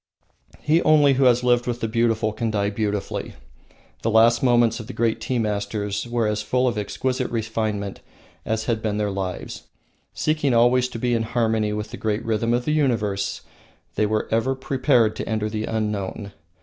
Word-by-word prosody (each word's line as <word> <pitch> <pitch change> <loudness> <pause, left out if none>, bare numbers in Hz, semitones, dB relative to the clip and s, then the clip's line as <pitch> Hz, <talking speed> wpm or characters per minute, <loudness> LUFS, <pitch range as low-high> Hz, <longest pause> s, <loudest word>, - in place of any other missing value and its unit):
He 160 +3 +3
only 145 -3 +5
who 135 0 +2
has 125 0 +4
lived 120 0 +2
with 120 -1 -2
the 115 - -1
beautiful 115 -1 +1
can 115 +1 -2
die 100 -1 0
beautifully. 105 -1 -3 0.7
The 115 - 0
last 115 +1 +5
moments 120 -2 +3
of 110 - -8
the 130 - -7
great 115 -1 0
tea 130 - -1
masters 105 -1 -2
were 120 -1 0
as 105 0 0
full 125 +4 +1
of 120 - 0
exquisite 125 +5 -2
refinement 110 -3 -3 0.4
as 110 0 -2
had 115 -1 -1
been 105 -2 -1
their 105 -1 -1
lives. 95 -2 -5 0.4
Seeking 155 -5 0
always 125 +2 +4
to 120 - -7
be 120 +1 0
in 115 - +1
harmony 110 -2 0
with 105 +1 -4
the 120 - -7
great 110 +1 -2
rhythm 115 +1 0
of 120 +1 0
the 150 - +1
universe, 115 -10 0 0.5
they 105 - +1
were 110 0 -1
ever 115 +4 +1
prepared 130 -4 +2
to - - -4
enter 110 -1 -1
the 110 0 -2
unknown. 105 -2 -3
115 Hz, 185 wpm, -23 LUFS, 105-120 Hz, 0.7 s, only